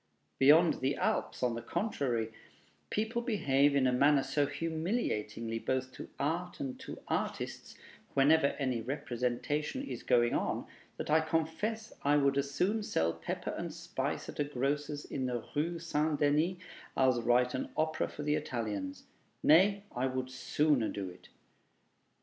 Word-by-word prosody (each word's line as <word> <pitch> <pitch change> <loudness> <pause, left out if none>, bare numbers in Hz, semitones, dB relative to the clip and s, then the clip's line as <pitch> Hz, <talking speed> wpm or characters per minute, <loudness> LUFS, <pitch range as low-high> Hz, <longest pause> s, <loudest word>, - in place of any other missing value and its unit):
Beyond 155 +5 +6
the 135 +2 +1
Alps, - - -1
on 125 -1 +2
the 115 - -4
contrary, 120 - -1 0.6
people 220 +3 -1
behave 145 - +2
in 135 -2 +3
a 130 - +4
manner 140 +2 +4
so 140 +1 +1
humiliating 160 - -2 0.2
both 130 0 -1
to - - -9
art 170 +5 -2
and 135 -2 -4
to - - -7
artists, - - -3 0.4
whenever 145 +2 +5
any 130 -5 -1
representation 130 - -2
is 275 - -5
going 120 -1 +3
on, - - -1 0.3
that - - -3
I 160 +1 +5
confess 165 +8 -2
I 145 +1 +3
would 140 -1 +3
as 140 0 -1
soon 195 +10 +1
sell 85 - 0
pepper 80 0 -4
and - - -4
spice - - -3
at - - -8
a - - +4
grocer's 145 +1 -2
in 130 -2 -3
the 120 -3 -3
Rue 165 +4 0
St. 155 -2 0
Denis 155 +5 +2 0.4
as 130 -2 +4
write 125 +1 +3
an 130 - -3
opera 155 0 +1
for 150 - -7
the 150 0 +1
Italians 105 -9 -3 0.4
nay, 195 +6 +5
I 125 +2 +1
would 130 0 -3
sooner 130 0 +1
do 95 -3 -4
it. 90 - -16
140 Hz, 155 wpm, -32 LUFS, 125-160 Hz, 0.6 s, Beyond